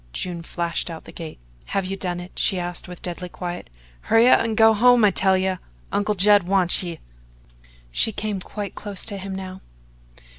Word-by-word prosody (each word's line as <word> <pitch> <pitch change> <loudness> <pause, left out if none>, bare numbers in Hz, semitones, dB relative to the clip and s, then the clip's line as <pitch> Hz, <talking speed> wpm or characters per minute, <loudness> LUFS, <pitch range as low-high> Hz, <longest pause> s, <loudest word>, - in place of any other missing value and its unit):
June 175 - -3
flashed 170 +1 -3
out 165 -1 -7
the - - -11
gate. 165 -2 -8 0.3
"Have 195 -1 -1
you 190 +1 -3
done 180 -2 -3
it?" 175 +1 -9
she 190 - +2
asked 175 0 -4
with 180 -1 -10
deadly 180 0 -5
quiet. 175 - -6 0.4
"Hurry 225 +2 +6
up - - +7
an' 225 -1 -1
go 220 0 +7
home, 240 +1 +6
I 200 - +5
tell 190 +1 +3
ye! 185 0 0 0.3
Uncle 210 +1 +1
Judd 200 -1 +5
wants 185 -2 +3
ye!" 170 -3 -5 0.9
She 220 - +1
came 210 -1 -3
quite 205 +2 -6
close 205 -3 -4
to 200 -3 -5
him 190 0 -5
now. 190 0 -7
190 Hz, 190 wpm, -23 LUFS, 175-205 Hz, 0.9 s, up